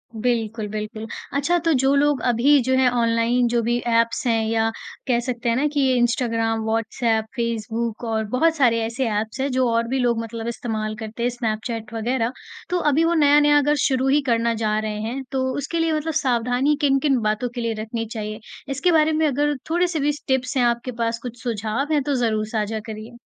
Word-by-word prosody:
बिल्कुल, 225 -2 -1
बिल्कुल। 215 +1 -5 0.3
अच्छा 340 +5 +2
तो 330 - +4
जो 270 +1 +3
लोग 285 -2 +2
अभी 265 +5 +4
जो 260 +2 0
है 260 -1 +4
ऑनलाइन 230 +1 +2
जो 235 0 +1
भी 240 +1 +1 0.2
ऐप्स 230 +4 +1
हैं 225 -1 +2
या 225 0 +1 0.4
कह 240 -2 +2
सकते 240 -1 -2
हैं 230 - +2
ना 280 +5 +2
कि 290 - 0
ये 265 -2 +3
इंस्टाग्राम, 230 -2 +1
व्हाट्सऐप, 225 0 0
फेसबुक 230 -1 -3
और 220 -1 0
बहुत 325 +4 +3
सारे 245 -6 +3
ऐसे 245 +3 -2
ऐप्स 215 +4 -3
हैं, 275 - 0
जो 255 0 +2
और 230 0 +1
भी 265 +2 -1
लोग 240 -2 +1
मतलब 230 0 -6
इस्तेमाल 220 -2 -3
करते 220 +2 -5
हैं, 245 - +2
स्नैपचैट 225 -1 -4
वग़ैरह, 230 +1 -1 0.4
तो 360 - +1
अभी 305 +4 +3
वो 335 - +2
नया-नया 295 -1 +5
अगर 295 +1 +3
शुरू 265 -1 +1
ही 285 +2 +3
करना 230 0 +2
जा 215 0 +1
रहे 215 -1 -3
हैं, 245 +5 -4
तो 265 -1 0
उसके 290 +4 -2
लिए 325 -1 +1
मतलब 310 +1 -2
सावधानी 250 +3 +1
किन-किन 275 -1 +3
बातों 215 +3 -1
के 240 - -3
लिए 230 -1 -1
रखनी 225 +1 -4
चाहिए, 215 -1 -5 0.3
इसके 280 +7 +1
बारे 315 -1 +4
में 310 0 +2
अगर 290 +1 +1
थोड़े-से 345 -1 +1
भी 290 +1 +2
स 295 - -9
टिप्स 265 0 0
हैं 250 - +3
आपके 235 +1 0
पास, 230 0 0
कुछ 240 -2 -8
सुझाव 230 +4 -2
हैं, 295 - +3
तो 285 +1 0
ज़रूर 220 -4 0
साझा 220 0 -2
करिए? 220 +2 -8
240 Hz, 205 wpm, -22 LUFS, 225-275 Hz, 0.4 s, नया-नया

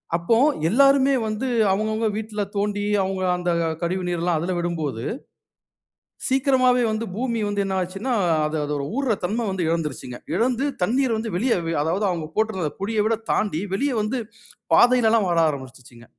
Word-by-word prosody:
அப்போ, 170 +7 +2 0.3
எல்லாருமே 275 +4 +5
வந்து 215 +4 -2 0.3
அவங்கவங்க 215 +2 0
வீட்ல 215 -1 -4
தோண்டி, 205 0 -1 0.2
அவங்க 190 0 -3 0.2
அந்த 175 0 -1 0.3
கழிவுநீரெல்லாம் 175 -1 -1
அதுல 175 +3 -2
விடும்போது. 160 -9 -3 1.2
சீக்கிரமாவே 260 -2 +3
வந்து 220 +1 -2
பூமி 235 0 -1
வந்து 205 0 -1
என்ன 190 0 -2
ஆச்சுனா, 195 +8 -4 0.3
அது 155 +1 -2
அதோட 145 -1 -2
ஊர்ர 270 -4 +1
தன்மை 220 +6 -1
வந்து 190 -2 -2
எழந்துருச்சுங்க. 150 -7 -3 0.2
இழந்து 245 +6 +1 0.2
தண்ணீரை 245 +6 +2
வந்து 220 -2 -4
வெளிய 235 +7 +2
வ - - -2
அதாவது 180 +7 0
அவுங்க 165 -4 -3
போட்டிருந்த 210 -7 0
குழிய 215 +2 0
விட 225 - +2 0.2
தாண்டி, 195 -6 0
வெளியே 275 +5 0
வந்து, 215 +5 -2 0.6
பாதையிலெல்லாம் 230 -4 +5
வர 170 -1 +2
ஆரம்பிச்சிருச்சுங்க. 130 -4 -9
205 Hz, 145 wpm, -23 LUFS, 170-230 Hz, 1.2 s, எல்லாருமே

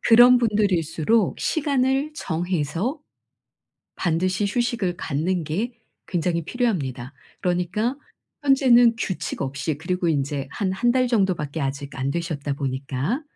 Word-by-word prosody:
그런 245 +2 +7
분들일수록 200 -3 +1
시간을 280 -1 +1
정해서 175 - -2 1.0
반드시 185 +3 0
휴식을 225 -5 -1
갖는 165 +3 -1
게 200 +11 -2 0.3
굉장히 170 -2 -1
필요합니다. 145 - -2 0.3
그러니까 180 +8 0 0.5
현재는 245 -4 +5
규칙 180 -10 -3
없이 140 +2 -2
그리고 175 +3 -1
인제 140 -2 -1
한 190 +5 -2
1 240 +5 +2
달 255 0 +2
정도밖에 185 - 0
아직 140 +1 -4
안 135 0 -1
되셨다 150 -3 -3
보니까 135 - -2
180 Hz, 275 characters per minute, -23 LUFS, 150-235 Hz, 1.0 s, 그런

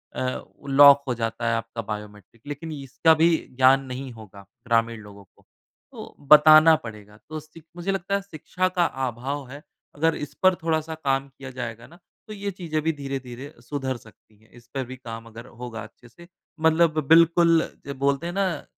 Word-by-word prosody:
अ, 130 0 -2 0.3
lock 140 0 +8
हो 125 - 0
जाता 115 +1 -2
है 115 - +1
आपका 115 0 -5
बायोमेट्रिक 105 0 -9
लेकिन 145 +3 -6
इसका 150 +2 +2
भी 165 - +6 0.3
ज्ञान 135 +1 +5
नहीं 130 +1 -6
होगा 105 -3 -13 0.2
ग्रामीण 115 -1 +1
लोगों 100 -1 -13
को, 95 - -30 0.5
तो - - -11 0.2
बताना 155 +1 +8
पड़ेगा। 105 -2 -11
तो 155 0 -5
सि 155 +2 -16
मुझे 175 +2 -2
लगता 195 +1 -2
है 200 - -1
शिक्षा 185 0 -3
का 175 - +4 0.2
अभाव 130 +4 -5
है 140 +2 -10 0.3
अगर 165 +2 +1
इस 150 - -7
पर 185 -1 +5
थोड़ा-सा 160 -1 -1
काम 135 -3 -1
किया 135 -1 -11
जाएगा 120 -2 -7
ना 170 +2 -18 0.3
तो 215 - -8
ये 200 -1 -4
चीज़ें 165 -5 -3
भी 160 - +2
धीरे-धीरे 135 -1 -7
सुधर 130 0 -4
सकती 110 -1 -21
हैं। 110 - -25
इस 120 -1 -18
पर 135 -1 -2
भी - - -6
काम 115 -3 -9
अगर 115 +1 -11 0.2
होगा 115 -3 -6
अच्छे 115 +3 -16
से 170 +9 -16 0.3
मतलब 160 0 +3
बिल्कुल 165 +1 +5 0.2
जो 140 - -5
बोलते 140 +3 0
हैं 175 - -5
ना, 185 -6 -1
135 Hz, 185 wpm, -24 LUFS, 115-160 Hz, 0.5 s, lock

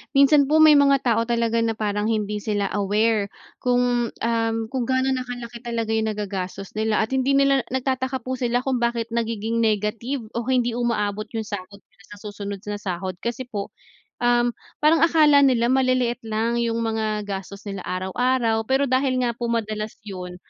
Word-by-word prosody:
minsan 280 +1 +6
po, 315 +1 +4
may 305 -2 +8
mga 275 -1 +4
tao 230 -2 +2
talaga 230 -1 +1
na 225 0 +1
parang 210 -1 -1
hindi 210 -2 -1
sila 205 -1 -1
aware 210 +1 +1 0.3
kung, 245 -1 +1
um, 225 -1 0 0.2
kung 255 -3 -1
gaano 260 0 +1
na 255 -1 -2
kalaki 240 -1 -7
talaga 230 -2 -3
yung 220 -1 0
nagagastos 195 -1 -5
nila 220 0 +1
at 220 - -4
hindi 265 +1 +1
nila 275 0 +4
nagtataka 260 0 -1
po 260 0 -3
sila 245 0 +1
kung 265 -2 0
bakit 235 -1 -1
nagiging 230 -1 -1
negative 225 +4 -1
o 235 0 -3
hindi 245 -2 +2
umaabot 215 -3 -1
yung 220 - -1
sahod 200 -1 -7
nila 220 - -25
sa 205 - -11
susunod 200 -1 -6
na 205 - -2
sahod. 185 -1 -4
Kasi 235 +2 -3
po, 200 -2 -4 0.5
um, 240 0 +3 0.3
parang 315 +2 +5
akala 310 -3 +5
nila 250 -3 +3
maliliit 255 -2 +1
lang 225 +2 0
yung 230 0 0
mga 215 -2 -1
gastos 200 +1 -6
nila 195 -2 -5
araw-araw, 225 +5 0
pero 270 +1 +3
dahil 255 -1 +1
nga 235 - +1
po 235 0 -4
madalas 215 -2 -2
yun, 180 -3 -7
230 Hz, 175 wpm, -23 LUFS, 210-255 Hz, 0.5 s, may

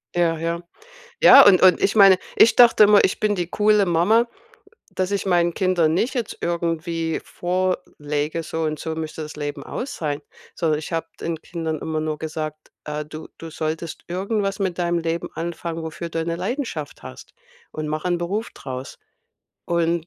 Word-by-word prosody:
Ja, 170 -2 +2
ja. 170 +1 -2 0.6
Ja, - - +10
und 190 -3 +6
und 185 -1 +6
ich 200 - +2
meine, 195 -2 +8 0.2
ich 230 - +6
dachte 235 -3 +7
immer, 210 0 +6
ich 190 - +1
bin 210 -1 +1
die 175 -3 -3
coole 210 +1 +3
Mama, 195 +7 +3 0.6
dass 185 0 -2
ich 200 -1 -2
meinen 175 -2 +2
Kindern 175 -4 +2
nicht 230 +8 0
jetzt 240 -5 -3
irgendwie 165 -1 -2
vorlege: 165 -4 -2
„So 160 +1 -4
und 155 -1 -1
so 160 +2 -4
müsste 160 0 -5
das 150 - -9
Leben 145 -1 -5
aussehen“, 155 - -4 0.3
sondern 160 -3 0
ich 155 +3 -7
habe 165 0 -2
den 165 -1 -4
Kindern 160 -2 -4
immer 160 -1 -3
nur 155 -1 -3
gesagt: 155 -1 -6
„Äh, 150 0 -4
du 155 +1 -9
du 165 - -8
solltest 160 +1 -4
irgendwas 195 +2 -2
mit 190 -3 -1
deinem 175 -1 0
Leben 165 0 -3
anfangen, 170 0 -4
wofür 160 +1 -6
du 165 - -3
eine 165 +1 -2
Leidenschaft 185 - -4
hast - - -11 0.4
und 155 0 -5
mach 155 +2 -3
'n 175 -1 0
Beruf 200 +6 -3
draus.“ 130 -1 -8 0.7
Und 170 -1 0
170 Hz, 175 wpm, -22 LUFS, 155-185 Hz, 0.7 s, Ja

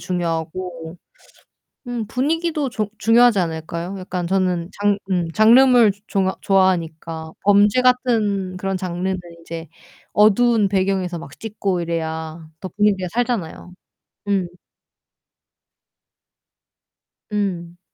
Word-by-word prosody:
중요하고 170 0 -4 0.9
음, 235 -3 -3
분위기도 305 +3 -1
좋 215 -4 -3
중요하지 235 -1 +5
않을까요? 170 +3 -4
약간 180 -1 -4
저는 185 -2 0
장 205 0 +2
음 175 -3 0
장르물 235 +1 +6 0.2
좋아 190 -2 0
좋아하니까. 165 -4 0
범죄 205 +4 +4
같은 220 -7 +1
그런 195 0 -2
장르는 185 +1 -3 0.2
이제 165 0 -7 0.5
어두운 215 +1 +4
배경에서 190 -2 0
막 140 -3 -11
찍고 200 -4 -2
이래야 160 -1 -4
더 185 - -5
분위기가 200 -1 +1
살잖아요. 230 -8 -3 0.6
음. 195 -3 +1 2.9
음. 175 -4 -3
190 Hz, 230 characters per minute, -20 LUFS, 170-215 Hz, 2.9 s, 장르물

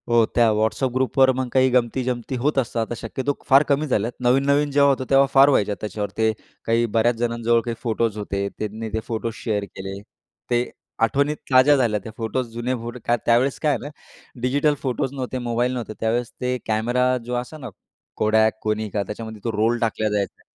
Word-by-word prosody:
हो, 120 -1 +5
त्या 120 -1 +5
WhatsApp 110 +4 0
ग्रुपवर 130 +1 +3
मग 130 0 -2
काही 130 0 +4
गंमती-जमती 125 0 0
होत 140 +4 0
असतात, 115 -3 0
तर 120 - -3
शक्यतो 130 +6 -3 0.2
फार 135 +1 +7
कमी 145 +2 +2
झाल्यात. 115 -3 0
नवीन-नवीन 140 +4 +2
जेव्हा 140 0 +5
होतं, 130 -1 0
तेव्हा 135 0 +6
फार 135 +1 +7
व्हायच्या 105 -7 +2
त्याच्यावर. 105 0 -3
ते 110 0 +3 0.3
काही 115 +1 +2
बऱ्याच 115 +2 +3
जणांजवळ 115 0 +1
काही 120 -1 -2
फोटोज 115 -2 -1
होते, 100 -1 -2
त्यांनी 110 +1 -4
ते 110 - 0
फोटोज 115 -1 -3
शेअर 105 -3 -1
केले, 95 0 -7 0.5
ते 120 0 +1 0.3
आठवणीत 140 +6 +2 0.2
ताज्या 130 +3 +7
झाल्या 115 -5 +1
त्या. 110 - -8
फोटोज, 120 +2 -2
जुने 120 +2 -2
फोटो, 120 +2 -7
का 120 - +3
त्यावेळेस 125 +3 +2
काय 150 - +2
आहे 140 - 0
ना, - - -5 0.5
डिजिटल 145 +4 +2
फोटोज 135 +1 -2
नव्हते, 130 -1 -4
मोबाईल 120 +2 +1
नव्हते. 120 -3 -4
त्यावेळेस 115 +1 -1
ते 125 0 0
कॅमेरा 120 +4 +1
जो 125 - -4
असा 125 +6 -4
ना 130 -5 -7 0.5
Kodak, 110 +1 +4
Konica, 105 -1 -1
त्याच्यामध्ये 110 0 -7
तो 115 - -1
रोल 115 +3 +2
टाकला 110 -1 0
जायचा. 100 -1 -2
120 Hz, 185 wpm, -22 LUFS, 110-130 Hz, 0.5 s, फार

